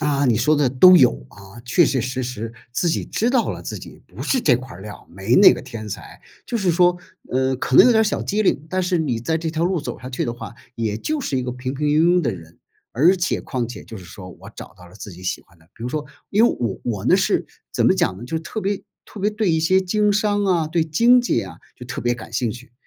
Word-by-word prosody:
啊， 145 -2 +1
你 120 -4 +3
说 155 +6 +3
的 140 -3 +2
都 180 +8 +7
有。 - - +6 0.2
啊， 100 +3 -14
确 125 +8 +3
确 135 -2 0
实 130 +2 -3
实 115 -2 -5 0.2
自 170 - 0
己 165 - -1
知 230 - -1
道 250 -3 +1
了， - - -6
自 - - -6
己 - - -13
不 - - -9
是 260 - +1
这 125 - +3
块 130 -4 -10
料 105 +1 -8
儿， - - -20
没 95 +6 -1
那 200 - +8
个 - - -5
天 115 -4 -8
才。 - - -9 0.3
就 235 - -2
是 195 -5 +1
说， 175 +1 +3 0.4
嗯， 130 0 0
可 130 -1 0
能 - - +9
有 250 - +6
点 220 - +4
儿 220 - +3
小 210 - -1
机 210 +1 0
灵， 155 -5 0
但 185 0 0
是 180 -1 0
你 130 -8 -1
在 160 +7 -1
这 160 0 -3
条 160 +1 -1
路 180 -2 0
走 - - -6
下 125 - -8
去 130 - -3
的 120 - -2
话， 120 -1 -9 0.2
也 110 -2 -2
就 305 - -3
是 140 - -2
一 130 - -1
个 125 - -4
平 130 +2 -5
平 150 +2 -2
庸 165 +4 +4
庸 - - +2
的 125 -9 -1
人。 85 -1 -14 0.3
而 170 +10 +4
且 170 -1 -1
况 125 -4 -3
且 120 - -9
就 110 - -10
是 90 - -12
说， 90 +1 -11
我 95 +4 -13
找 95 - -11
到 90 -1 -15
了 90 - -18
自 105 -2 -9
己 90 +2 -13
喜 90 - -3
欢 85 - -26
的， 80 - -25
比 - - -12
如 120 - -3
说， 150 +3 -3 0.3
因 210 +3 +4
为 - - 0
我 115 -5 -3
我 105 -5 -3
呢， - - +4
是 - - 0 0.3
怎 - - +1
么 - - +5
讲 95 - 0
呢？ 120 - -9
就 160 +6 -4
特 190 +7 -6
别 200 0 -2 0.2
特 210 - -11
别 210 +2 +1
对 210 -2 -1
一 160 -1 +1
些 185 +4 +3
经 205 +2 +1
商 205 0 +1
啊， 175 -5 +1
对 165 +1 0
经 235 +11 +4
济 245 - 0
呀， 90 -4 -6 0.2
就 125 - -10
特 - - -5
别 120 0 0
感 115 -1 -11
兴 115 0 -1
趣。 120 +2 -11
135 Hz, 300 characters per minute, -21 LUFS, 115-180 Hz, 0.4 s, 能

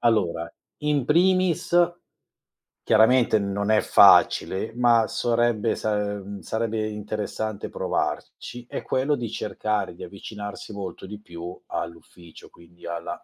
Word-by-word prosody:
Allora, 95 -8 +1 0.3
in 150 -4 0
primis, 185 +1 +2 1.1
chiaramente 110 0 +4
non 100 +1 -1
è 110 - +4
facile, 105 +4 +5
ma 120 -2 +4
sarebbe 120 -2 +1
sa 105 -1 -1 0.2
ehm, 100 0 -8
sarebbe 110 +2 -2
interessante 105 0 -4
provarci, 120 0 -3
è - - -5
quello 135 +3 +1
di 120 -3 -4
cercare 105 -3 -2
di - - -10
avvicinarsi 105 +1 -8
molto 100 -1 -7
di 105 +1 -8
più 85 -3 -9
all'ufficio, 85 0 -8
quindi 85 +1 -18
alla 85 0 -5
110 Hz, 120 wpm, -24 LUFS, 100-120 Hz, 1.1 s, facile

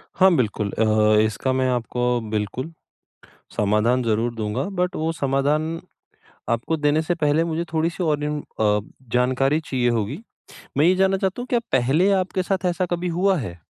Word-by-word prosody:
हाँ, 185 -2 +5
बिल्कुल 105 -4 -1
अ, 110 -1 +3
इसका 110 +5 -1
मैं 130 0 +1
आपको 125 0 0
बिल्कुल, 110 +8 -3 0.9
समाधान 105 +5 +2
ज़रूर 115 +1 0
दूँगा, 105 -1 -2
बट 180 -2 -1
वो 160 +1 -1
समाधान 150 +3 0 0.7
आपको 115 +8 0
देने 150 +1 +2
से 175 +2 -1
पहले 155 0 +2
मुझे 165 0 -2
थोड़ी-सी 165 +3 -1
और 150 -2 0
इन 150 0 -2 0.2
अ, 105 -1 +3 0.3
जानकारी 130 +4 +2
चाहिए 125 -5 -1
होगी। 115 - -1 0.6
मैं 150 - +4
ये 185 +1 +5
जानना 190 0 +2
चाहता 190 +5 -2
हूँ 250 - -7
क्या 240 - +2
पहले 135 +10 +3
आपके 185 -1 0
साथ 185 -1 -1
ऐसा 180 +1 0
कभी 175 +1 -1
हुआ 195 -1 +3
है? 90 - -6
145 Hz, 165 wpm, -22 LUFS, 115-170 Hz, 0.9 s, हाँ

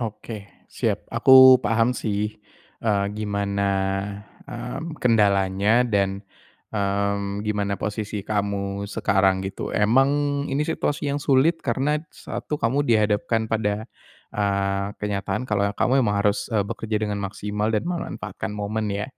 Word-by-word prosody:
Oke, 110 -2 -6 0.2
siap. - - -1
Aku 130 -1 +8
paham 115 +3 +2
sih, 105 0 -2 0.5
eee, 100 -3 +2
gimana, 100 -1 -2 0.9
mmm, 140 +7 -6
kendalanya 105 -1 +3
dan, 100 -3 0 0.5
mmm, 100 0 -1
gimana 105 -2 -1
posisi 105 -1 -3
kamu 100 -1 -2
sekarang 95 -2 +2
gitu. 95 0 -5
Emang 120 +6 +4 0.4
ini 140 +2 0
situasi 145 -2 -1
yang 145 - -2
sulit 145 +4 +3
karena 140 +6 0
satu, 150 - -5
kamu 125 +5 +1
dihadapkan 110 0 +2
pada, 105 -1 0 0.5
eee, 100 -1 0
kenyataan 105 +3 -2
kalau 100 -1 +1
ya 100 - -5
kamu 135 +2 +3
emang 105 -2 +1
harus, 105 0 +1
eee, 105 -3 +2
bekerja 110 +1 -3
dengan 105 -1 -1
maksimal 105 +2 -3
dan 105 - 0
memanfaatkan 105 - -4
momen 105 +1 -2
ya. 100 +1 -2
105 Hz, 130 wpm, -24 LUFS, 100-115 Hz, 0.9 s, Aku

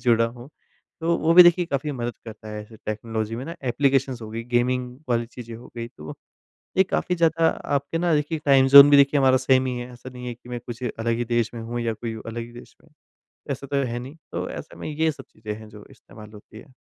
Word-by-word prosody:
जुड़ा 115 -2 +4
हूँ। 120 +3 -10 0.5
तो 170 +1 +1
वो 160 +1 +2
भी 180 - +12
देखिए 175 0 +5
काफ़ी 145 -1 -2
मदद 120 -2 -4
करता 110 -1 -10
है 105 0 -6
ऐसे 110 +1 -15
टेक्नोलॉजी 110 +1 -3
में 125 - -5
ना 165 - -6
एप्लीकेशंस 130 -1 +1
हो 110 - -7
गई, 115 +1 -5
गेमिंग 125 +1 -1
वाली 120 0 +1
चीज़ें 115 -1 -10
हो 120 +2 -13
गई, 115 0 -4
तो 75 -10 -10 0.6
ये 190 - +7
काफ़ी 180 -1 -1
ज़्यादा 165 -1 +3 0.3
आपके 140 +4 -3
ना 170 -1 +2
देखिए 150 +2 -1
टाइम 135 -1 +6
ज़ोन 140 +1 +12
भी 145 - +7
देखिए 140 +1 +5
हमारा 130 -1 +5
सेम 130 0 +3
ही 125 -1 -2
है, 120 +1 -7
ऐसा 125 +1 -11
नहीं 125 0 -9
है 120 - -4
कि 120 +1 -19
मैं 120 -1 -5
कुछ 120 +1 -7
अलग 115 0 -2
ही 120 - -1
देश 120 -1 +1
में 115 - -6
हूँ 120 +1 -4
या 115 -1 -1
कोई 115 +1 -5
अलग 115 +1 -5
ही 120 +1 -11
देश 120 - -13
में, 160 - -24 0.6
ऐसा 140 0 -4
तो 140 0 0
है 120 0 -3
नहीं। 130 +5 -9 0.2
तो - - -3
ऐसे - - -8
में - - -6
ये 160 +1 +1
सब - - -12
चीज़ें 110 -1 -7
हैं, 110 0 -11
जो 105 -1 -13
इस्तेमाल 105 +1 -14
होती 105 +1 -14
है। 130 +3 -16
125 Hz, 245 wpm, -24 LUFS, 115-140 Hz, 0.6 s, भी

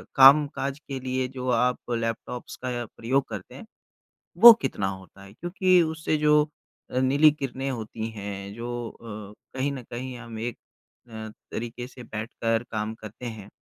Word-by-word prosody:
कामकाज 140 0 +6
के 135 -2 -4
लिए 130 0 -1
जो 130 -1 -4
आप 125 +1 +1
लैपटॉप्स 115 +1 -3
का 120 -1 -2
प्रयोग 130 +5 -1
करते 100 -4 -7
हैं - - -10 0.8
वो 235 -1 +14
कितना 95 -2 -1
होता 95 +1 -8
है? 100 +1 -13
क्योंकि 180 - +3
उससे 160 -1 0
जो 150 0 +5 0.5
अ, 125 - +1
नीली 140 +4 +6
किरणें 135 -2 -4
होती 110 -1 -4
हैं 100 -1 -6
जो 120 +1 -4
अ, 105 -3 -9 0.2
कहीं 140 +2 +1
न 130 -3 -6
कहीं 125 +1 -5
हम 115 -2 -8
एक 120 0 -3 0.5
अ, 110 -1 -7 0.2
तरीके 120 +1 -5
से 125 -1 -12
बैठकर 115 +1 -2
काम 110 0 -2
करते 110 +3 -10
हैं, 110 -4 -7
120 Hz, 160 wpm, -26 LUFS, 110-135 Hz, 0.8 s, वो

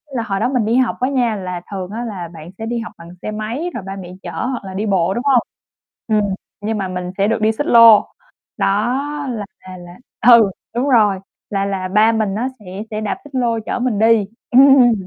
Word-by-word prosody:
là 230 - -1
hồi 195 -3 -2
đó - - +1
mình 250 -5 0
đi 225 - +1
học 255 -2 +1
á 255 +2 +1
nha 245 -5 +1
là 180 -3 -5
thường 190 -1 -5
á 230 +3 -4
là 190 -6 -5
bạn 160 0 -10
sẽ 225 - -5
đi 235 +1 -2
học 225 - -7
bằng 170 0 -12
xe 215 - -4
máy 225 +11 -4
rồi 215 - -5
ba 195 - -5
mẹ 180 -2 -9
chở - - -6
hoặc 255 -3 -3
là 190 - -7
đi 205 +3 -2
bộ, 190 -3 +1
đúng 240 - -3
hông? 265 -4 +4 0.7
Ừm, 210 -3 +1 0.3
nhưng 215 +1 -2
mà 195 -2 -2
mình 180 0 -5
sẽ 200 - +2
được 225 0 0
đi 220 +1 +3
xích 290 +7 -3
lô, 230 -3 +8 0.5
đó - - +1 0.6
là 215 -4 -4
là 185 0 -11
là 175 0 -12 0.3
ừ, 230 -5 +7 0.2
đúng 255 +4 0
rồi, 210 -6 +4 0.3
là 195 -1 -1
là 190 -2 -3
ba 215 +4 +4
mình 215 -3 -1
á 235 +4 -1
sẽ 205 - -17 0.3
sẽ 215 0 -3
đạp 210 - -2
xích 290 -2 -12
lô 235 -3 +1
chở - - -2
mình 245 -4 -1
đi. 225 -1 +4 0.3
Ừm, 260 -2 +7
215 Hz, 235 wpm, -18 LUFS, 195-240 Hz, 0.7 s, lô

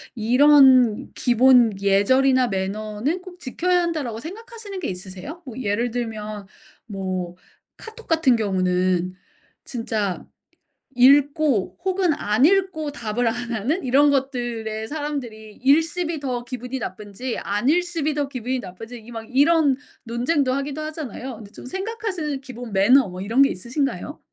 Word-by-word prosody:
'이런 255 -1 +5
기본 240 -3 +4
예절이나 255 +7 +3
매너는 215 - -2
꼭 365 -1 -12
지켜야 355 +5 0
한다.'라고 295 -10 -3
생각하시는 425 - -8
게 345 - -3
있으세요? 190 - -8
뭐 250 -3 -9
예를 230 +1 -1
들면 215 -4 -5 0.4
뭐 185 -3 -4 0.4
카톡 450 +1 -12
같은 320 -7 +3
경우는 185 -3 0 0.5
진짜 220 -6 -3 0.7
읽고 280 - +3
혹은 375 -3 +1
안 215 -1 +1
읽고 370 -4 +2
답을 235 -2 -1
안 240 +1 -4
하는 270 - -1
이런 280 +3 +4
것들의 240 -5 -2
사람들이 260 -8 -5
읽씹이 325 +4 +2
더 250 -3 -3
기분이 250 +1 -5
나쁜지 210 +4 -5
안읽씹이 305 - 0
더 290 -1 -1
기분이 255 -1 -3
나쁜지 225 +5 -9
이 225 +1 -14
막 225 -1 -6
이런 285 +1 +4 0.3
논쟁도 255 +4 0
하기도 275 +2 -3
하잖아요. 280 -5 -6
근데 210 -2 -12
좀 - - -12
생각하시는 380 - -4
기본 245 -4 -9
매너 220 +5 +5
뭐 180 0 -8
이런 230 +7 +3
게 275 - +5
있으신가요? 255 +8 -3
255 Hz, 300 characters per minute, -22 LUFS, 215-295 Hz, 0.7 s, 이런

